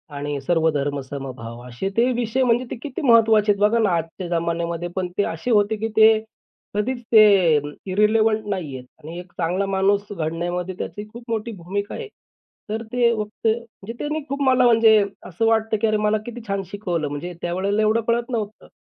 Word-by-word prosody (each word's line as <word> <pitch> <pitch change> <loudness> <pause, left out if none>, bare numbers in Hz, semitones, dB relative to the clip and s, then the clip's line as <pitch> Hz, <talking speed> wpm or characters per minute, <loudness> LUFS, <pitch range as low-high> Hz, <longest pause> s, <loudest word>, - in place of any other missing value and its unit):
आणि 145 0 -3
सर्वधर्म 145 -2 0
समभाव 130 -4 -7
असे 125 +11 -4
ते 245 +2 +4
विषय 245 +2 0
म्हणजे 245 0 +2
ते - - -2
किती 290 +4 -5
महत्त्वाचे 225 -5 +5
आहेत 200 - -1
बघा 210 +3 +4
ना, 220 -3 +3
आजच्या 170 +1 -2
जमान्यामध्ये 170 0 -2
पण 185 -1 -1
ते 205 - +3
असे 165 +9 -3
होते, 210 0 +3
की 220 +1 -2
ते 220 0 +7 0.5
कधीच 240 +5 -1
ते 215 -2 +8 0.7
इर्रेलेवेंट 215 +2 +2
नाहीयेत 150 -10 -4 0.2
आणि 165 +3 -8
एक 180 0 -11
चांगला 180 +3 0
माणूस 195 +1 +2
घडण्यामध्ये 175 +2 -3
त्याची 210 0 -6
खूप 235 +1 -10
मोठी 225 0 -2
भूमिका 200 +3 -4
आहे. 460 - -6 0.6
तर 220 +2 -3
ते 240 -1 +3
फक्त 215 +1 -4
म्हणजे 230 -1 -3
त्यांनी 300 +1 -2
खूप 280 +1 -3
मला 255 -1 +4
म्हणजे 225 -3 +6 0.2
असं 185 +5 -2
वाटतं, 220 -1 +2
की 225 - +3
अरे, 215 0 +2
मला 210 0 +2
किती 240 0 -7
छान 195 -1 -1
शिकवलं. 175 -7 -2
म्हणजे 145 +5 -5
त्यावेळेला 190 +4 0
एवढं 215 +2 +2
कळत 235 +1 0
नव्हतं. 215 -3 -4
205 Hz, 180 wpm, -22 LUFS, 170-225 Hz, 0.7 s, ते